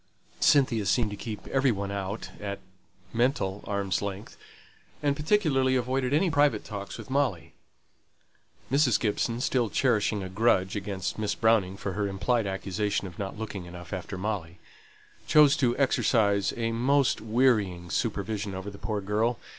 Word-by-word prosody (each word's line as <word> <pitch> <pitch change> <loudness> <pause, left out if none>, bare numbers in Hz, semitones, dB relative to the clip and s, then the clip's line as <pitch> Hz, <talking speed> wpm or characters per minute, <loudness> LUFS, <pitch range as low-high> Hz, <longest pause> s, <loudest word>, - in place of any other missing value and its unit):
Cynthia 120 -7 +3
seemed 115 -4 +2
to - - -4
keep 105 +1 -7
every 135 -1 +3
one 100 -2 -3
out 100 +2 -4
at 100 -1 -4 0.6
(mental) 115 -5 0
arms' 100 -3 -1
length; 100 +1 -6 0.7
and 140 -1 +2
particularly 150 -6 +2
avoided 130 +1 0
any 165 +5 +2
private 145 -8 +3
talks 100 -2 -6
with - - -10
Molly. 115 -13 0 1.2
Mrs. 135 -4 +4
Gibson, 115 +2 -1
still 125 -4 +1
cherishing 105 -4 +1
a - - -4
grudge 95 -1 +2
against 100 -1 -3
Miss 105 -1 -1
Browning 105 -4 +2
for 95 - -4
her 105 +1 -1
implied 105 +3 0
accusation 100 +2 -2
of 90 -3 -9
not 100 +1 -4
looking 105 -4 -5
enough 85 +1 -9
after 95 0 -5
Molly, 95 -4 -3 0.7
chose 150 -1 +6
to 125 -3 +1
exercise 105 -7 +2
a 115 -1 -1
most 130 +3 +2
wearying 110 -7 +1
supervision 100 +1 -2
over 95 +2 -6
the 100 - -12
poor 105 -2 -2
girl. 110 +4 0
105 Hz, 150 wpm, -28 LUFS, 100-125 Hz, 1.2 s, chose